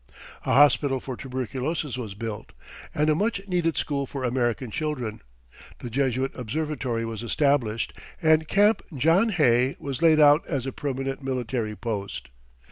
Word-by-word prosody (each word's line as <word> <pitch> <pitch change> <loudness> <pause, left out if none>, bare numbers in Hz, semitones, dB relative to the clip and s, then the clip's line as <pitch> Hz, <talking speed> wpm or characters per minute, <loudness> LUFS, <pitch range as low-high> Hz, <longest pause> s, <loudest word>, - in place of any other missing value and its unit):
A - - +2
hospital 135 0 +4
for 130 0 -6
tuberculosis 130 +3 -3
was 110 -6 -6
built, 110 - -6 0.4
and 150 +1 +2
a 155 - +4
much 205 +6 0
needed 170 -5 0
school 140 -1 -1
for 135 0 -5
American 120 -1 -1
children, 125 -7 -3 0.6
the 120 - -8
Jesuit 130 +1 0
observatory 130 -2 -3
was 115 -1 -5
established, 120 -3 +1 0.3
and 160 -2 +3
Camp 205 +5 +4 0.2
John 165 - +4
Hay 130 - +3
was 140 +1 -4
laid 160 -2 +5
out 150 +1 +6
as 135 -5 -2
a 135 - -3
permanent 135 0 -3
military 125 -4 -2
post. 100 -4 -5
135 Hz, 145 wpm, -25 LUFS, 120-150 Hz, 0.6 s, out